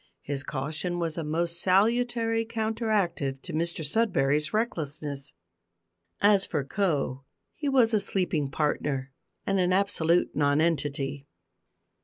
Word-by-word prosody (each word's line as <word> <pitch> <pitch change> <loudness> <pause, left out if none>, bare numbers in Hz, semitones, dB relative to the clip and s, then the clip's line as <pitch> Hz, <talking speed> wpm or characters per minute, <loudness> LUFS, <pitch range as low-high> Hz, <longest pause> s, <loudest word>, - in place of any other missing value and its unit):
His 140 -1 -2
caution 155 +6 -3
was 165 -2 -1
a 165 - -3
most 170 +3 0
salutary 225 +3 +2
counteractive 215 - -1
to - - -6
Mr 165 0 -1
Sudberry's 150 -6 +1
recklessness. 150 - -3 0.9
As 200 -1 +5
for 145 - -2
"Co," 140 -5 -1 0.3
he 290 -2 -3
was 245 -4 +4
a 215 - +4
sleeping 175 -8 0
partner, 140 -2 -1 0.3
and 195 -1 +1
an 180 0 +2
absolute 180 -3 +2
nonentity. 145 -2 0
170 Hz, 115 wpm, -27 LUFS, 145-205 Hz, 0.9 s, As